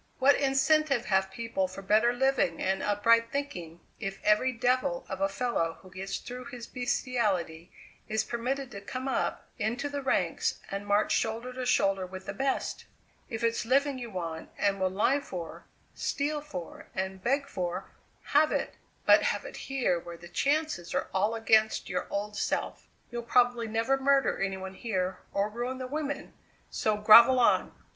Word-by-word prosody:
What 270 +2 +6
incentive 275 -1 +2
have 190 -1 +2
people 230 -3 -2
for 190 +2 -9
better 215 +4 +4
living 250 -9 +1
and 190 0 0
upright 230 +3 +3
thinking 175 - -5 0.2
if 195 -2 -4
every 210 +5 +3
devil 245 -7 0
of 190 0 -5
a 195 - +2
fellow 195 -6 -1
who 185 - -14
gets 195 +1 -4
through 250 +1 -8
his 245 -4 -8
beastiality 210 -10 -1 0.4
is 220 0 0
permitted 255 +3 -3
to 200 - -7
come 255 +6 -5
up 265 - -1
into 240 +7 -1
the 285 0 -3
ranks 265 - 0
and 200 +1 -4
march 205 +1 +2
shoulder 230 +3 -1
to 255 0 -4
shoulder 195 -5 +2
with 185 +1 -9
the - - -4
best? 270 0 -2 0.4
If 225 0 -4
it's 230 0 +1
living 270 +3 +2
you 240 -2 -6
want 165 -5 -5
and 195 -1 +1
will 185 - +2
lie 215 +9 +2
for, 175 - -7 0.3
steal 295 +1 -1
for, 185 - -8
and 190 0 -3
beg 275 +3 +1
for 180 -7 -4 0.4
have 305 +2 +5
it; - - -2 0.3
but - - +7
have - - -1
it - - -8
here 255 -10 +1
where 170 0 -9
the 175 0 -12
chances 285 - 0
are - - -1
all 205 +4 +1
against 220 -1 +3
your - - -2
old 205 +1 -3
self. - - -2 0.2
You'll 240 0 -3
probably 240 -1 +2
never 225 +5 +1
murder 275 0 +2
any 195 -1 -1
one 190 0 -7
here 190 -3 -2
or 200 +1 +1
ruin 240 +4 -4
the 255 - -5
women; 290 +2 -4 0.4
so 215 -1 0
grovel 230 +5 +8
on!" 240 - +3
230 Hz, 170 wpm, -29 LUFS, 190-260 Hz, 0.4 s, grovel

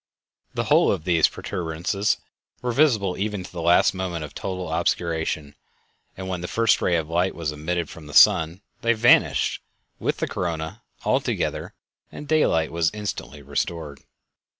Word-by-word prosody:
The - - 0
whole - - +4
of - - -2
these 85 -2 +4
protuberances 90 +5 -2 0.5
were 125 - 0
visible 115 -9 +2
even 105 -2 -2
to - - -11
the 85 - -5
last 85 +2 +4
moment 90 -4 -3
of 75 - -12
total 95 -1 -4
obscuration, 80 -3 -1 0.6
and 95 0 -6
when 90 -2 -3
the 90 - -4
first 115 +2 +2
ray 90 - +2
of 80 -2 -1
light 90 +3 0
was 80 -3 -2
admitted 80 +3 -2
from 75 0 -11
the 75 - -8
sun 80 +4 +6 0.2
they 115 0 +3
vanished, 120 +1 +3 0.4
with - - -1
the - - -2
corona, 85 +4 -4 0.2
altogether, - - -1 0.4
and 150 - -9
daylight 110 - +2
was 85 0 +1
instantly 75 - -5
restored. 75 +1 -3
85 Hz, 155 wpm, -24 LUFS, 80-100 Hz, 0.6 s, sun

